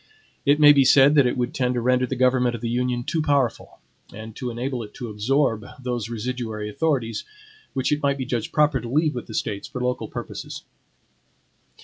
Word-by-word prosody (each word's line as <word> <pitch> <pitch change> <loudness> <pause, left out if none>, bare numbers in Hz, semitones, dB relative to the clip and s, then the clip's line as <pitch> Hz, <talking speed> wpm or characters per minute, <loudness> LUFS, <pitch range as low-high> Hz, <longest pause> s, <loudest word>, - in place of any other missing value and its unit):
It 145 +1 +4
may 145 -1 +9
be 140 -1 +5
said 135 +2 +6
that 140 -4 +5
it 125 - -1
would 125 0 -1
tend 125 -1 0
to - - 0
render 125 +1 +2
the 130 - -3
government 125 -1 +2
of 115 - -8
the 115 - -2
Union 125 0 -1
too 160 +6 -1
powerful, 140 -6 0 0.3
and 110 +1 -9
to 125 - -4
enable 120 +1 -3
it 105 -2 -10
to 120 -3 -6
absorb 115 +1 +1 0.2
those 120 -3 -3
residuary 115 -2 -4
authorities, 130 -5 -1 0.5
which 130 +1 -1
it 150 0 +1
might 140 -1 +1
be 130 - -3
judged 120 -3 -3
proper 150 -4 +2
to 120 - -7
leave 155 +4 +2
with 120 - -6
the 110 - -7
States 100 -1 -3
for 125 - -6
local 125 0 -2
purposes. - - -7
125 Hz, 205 wpm, -23 LUFS, 115-135 Hz, 0.5 s, may